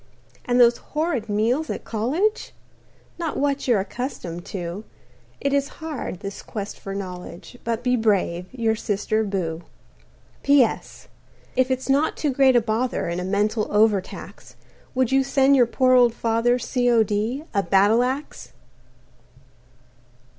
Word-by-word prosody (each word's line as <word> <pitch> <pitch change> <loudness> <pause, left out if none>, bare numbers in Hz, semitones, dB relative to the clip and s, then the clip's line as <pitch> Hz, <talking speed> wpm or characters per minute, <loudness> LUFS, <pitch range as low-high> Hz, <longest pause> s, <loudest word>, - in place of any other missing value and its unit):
"And 245 0 +2
those 240 -1 +6
horrid 300 -8 -3
meals 235 +9 0
at - - -4
college 295 - -1 0.7
Not 330 -3 -3
what 280 -1 0
you're 235 -5 +4
accustomed 190 -5 -5
to. 180 +1 -5 0.6
It 280 0 -1
is 280 0 +2
hard, 305 - -5
this 200 0 -6
quest 205 -2 -6
for 195 0 -6
knowledge, 180 +1 -8
But 230 +1 -2
be 250 0 +2
brave. 195 -6 0
"Your 230 -3 0
sister, 215 0 -1
Boo." 175 -5 -3 0.8
"P.S. 280 -5 +1 0.5
"If 255 0 +2
it's 260 0 -2
not 280 +3 +2
too 295 - 0
great 265 -1 +4
a 240 - +5
bother 225 -3 -1
And 170 +1 -2
a - - -3
mental 210 +3 0
overtax, 210 -2 -1 0.4
Would 255 -1 +1
you 270 0 +4
send 275 0 +3
your 245 -3 +5
poor 255 +2 +2
old 245 -2 +5
father, 230 +2 +1
C.O.D., 235 0 +1
a 200 - +2
battle 200 +5 +4
axe?" 265 +4 -4
235 Hz, 140 wpm, -23 LUFS, 205-260 Hz, 0.8 s, those